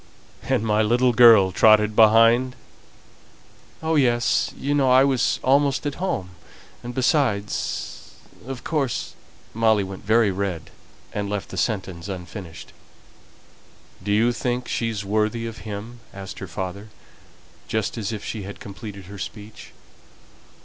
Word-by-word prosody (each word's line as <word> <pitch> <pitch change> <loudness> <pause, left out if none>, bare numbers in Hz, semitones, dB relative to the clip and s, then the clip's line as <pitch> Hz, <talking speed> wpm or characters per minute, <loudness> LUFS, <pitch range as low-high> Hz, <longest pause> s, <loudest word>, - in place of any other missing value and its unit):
"And - - 0
my 105 0 +2
little 120 +3 +3
girl 110 -5 +7
trotted 105 +2 +4
behind?" 115 +3 +5 1.3
"Oh, 160 0 0
yes. 120 -5 +2
You 140 +1 -1
know 140 -3 +3
I 130 +1 +6
was 135 -3 +1
almost 140 +1 +2
at 145 - -1
home, 95 - -2 0.5
and 120 +1 -7
besides 125 - -1 0.3
of 130 -2 -6
course 145 -6 -2 0.2
" - - -28
Molly 110 -2 +3
went 95 0 -8
very 110 0 +3
red, 95 -4 -4 0.4
and 100 -1 -3
left 105 -1 -4
the - - -8
sentence 95 -5 -2
unfinished. 90 -2 -8 1.3
"Do 100 +2 -3
you 115 +4 +3
think 125 0 -2
she's 110 -3 -2
worthy 110 +3 0
of 115 0 -7
him?" 110 +4 -7 0.2
asked 100 -1 -8
her 95 - -6
father, 95 +5 -6 0.8
just 110 -2 -2
as 110 -2 -3
if 105 -2 -6
she 110 - -4
had 100 +1 -8
completed 100 -1 -9
her 100 +2 -10
speech. 105 +2 -9
110 Hz, 135 wpm, -23 LUFS, 100-120 Hz, 1.3 s, girl